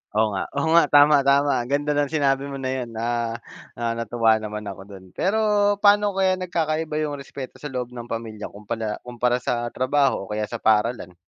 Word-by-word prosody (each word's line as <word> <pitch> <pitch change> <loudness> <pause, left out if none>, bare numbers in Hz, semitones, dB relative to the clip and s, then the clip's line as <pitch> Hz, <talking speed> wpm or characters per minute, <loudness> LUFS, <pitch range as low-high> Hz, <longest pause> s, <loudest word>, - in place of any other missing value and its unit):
Oo 110 -1 +2
nga, 95 - -1
oo 145 - +1
nga 170 - +7
tama-tama 145 -2 +5
ganda 145 +1 0
ng 145 -1 0
sinabi 140 -2 +1
mo 140 - -5
na 130 -1 -3
yun, 120 - -6
ah, 115 0 -2 0.6
natuwa 115 -1 +1
naman 105 0 -6
ako 100 -1 -7
do'n. 95 -2 -11
Pero, 200 +4 0 0.5
paano 205 -1 +4
kaya 190 -1 +3
nagkakaiba 160 -4 -2
yung 145 - -4
respeto 135 -1 -9
sa 150 - -5
loob 125 -2 -5
ng 120 -1 -8
pamilya 110 -2 -5
kumpala 105 +1 -4
kumpara 125 0 0
sa 120 -1 -2
trabaho 130 -3 +1
o - - -16
kaya 105 0 -2
sa 120 - -4
paaralan? 110 -3 +1
125 Hz, 180 wpm, -23 LUFS, 110-145 Hz, 0.6 s, nga